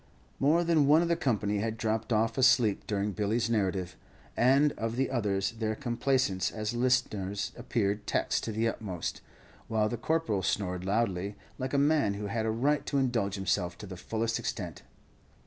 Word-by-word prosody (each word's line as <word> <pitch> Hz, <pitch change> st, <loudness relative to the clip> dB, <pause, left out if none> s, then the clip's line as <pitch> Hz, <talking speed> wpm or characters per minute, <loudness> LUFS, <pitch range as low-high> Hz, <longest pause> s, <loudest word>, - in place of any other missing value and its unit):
More 155 Hz, +5 st, +3 dB
than 165 Hz, -4 st, +3 dB
one 155 Hz, +4 st, +6 dB
of 170 Hz, -, -1 dB
the 170 Hz, -, +3 dB
company 105 Hz, -8 st, 0 dB
had 110 Hz, +1 st, -2 dB
dropped 110 Hz, +1 st, -1 dB
off 115 Hz, +1 st, +2 dB
asleep 125 Hz, -5 st, +3 dB
during 105 Hz, 0 st, -1 dB
Billy's 110 Hz, +4 st, 0 dB
narrative, 95 Hz, -4 st, 0 dB, 0.4 s
and 135 Hz, +4 st, +4 dB
of 115 Hz, -2 st, -3 dB
the 135 Hz, +1 st, 0 dB
others, 100 Hz, -5 st, 0 dB
their 110 Hz, -1 st, -2 dB
complaisance 120 Hz, -5 st, 0 dB
as 110 Hz, +1 st, -3 dB
listeners 115 Hz, -6 st, 0 dB
appeared 105 Hz, -2 st, -1 dB
taxed -, -, 0 dB
to 115 Hz, -, -3 dB
the 110 Hz, +2 st, 0 dB
utmost, 95 Hz, -6 st, -4 dB, 0.5 s
while 110 Hz, -1 st, +1 dB
the 120 Hz, -, -3 dB
Corporal 125 Hz, -6 st, 0 dB
snored 90 Hz, -1 st, -1 dB
loudly, 100 Hz, -2 st, 0 dB, 0.2 s
like 130 Hz, +2 st, -2 dB
a -, -, +4 dB
man 140 Hz, -8 st, +3 dB
who 105 Hz, +1 st, -5 dB
had 110 Hz, +2 st, -1 dB
a -, -, +1 dB
right 140 Hz, +7 st, +1 dB
to 140 Hz, -, 0 dB
indulge 120 Hz, -7 st, 0 dB
himself 90 Hz, -2 st, -1 dB
to -, -, -9 dB
the 95 Hz, -2 st, -8 dB
fullest 115 Hz, +5 st, -2 dB
extent. -, -, -4 dB
110 Hz, 175 wpm, -30 LUFS, 100-125 Hz, 0.5 s, one